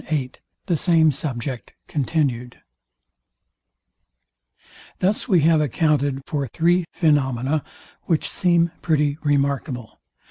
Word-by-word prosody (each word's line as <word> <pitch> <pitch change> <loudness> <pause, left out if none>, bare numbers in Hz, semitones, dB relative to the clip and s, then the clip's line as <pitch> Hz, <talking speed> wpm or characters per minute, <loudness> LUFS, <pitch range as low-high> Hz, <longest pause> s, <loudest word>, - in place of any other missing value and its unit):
VIII 140 -5 -1 0.3
THE 175 -4 0
SAME 160 -2 +4
SUBJECT 130 -3 -5
CONTINUed 135 -5 -1 2.4
Thus 200 +6 0
we 185 -8 +4
have 160 0 +4
accounted 145 -1 0
for 140 -3 -2
three 170 +7 +1
phaenomena, 145 -3 +1 0.4
which 165 -3 0
seem 170 -2 +2
pretty 150 -2 +1
remarkable. 140 -4 -1
150 Hz, 95 wpm, -22 LUFS, 135-165 Hz, 2.4 s, SAME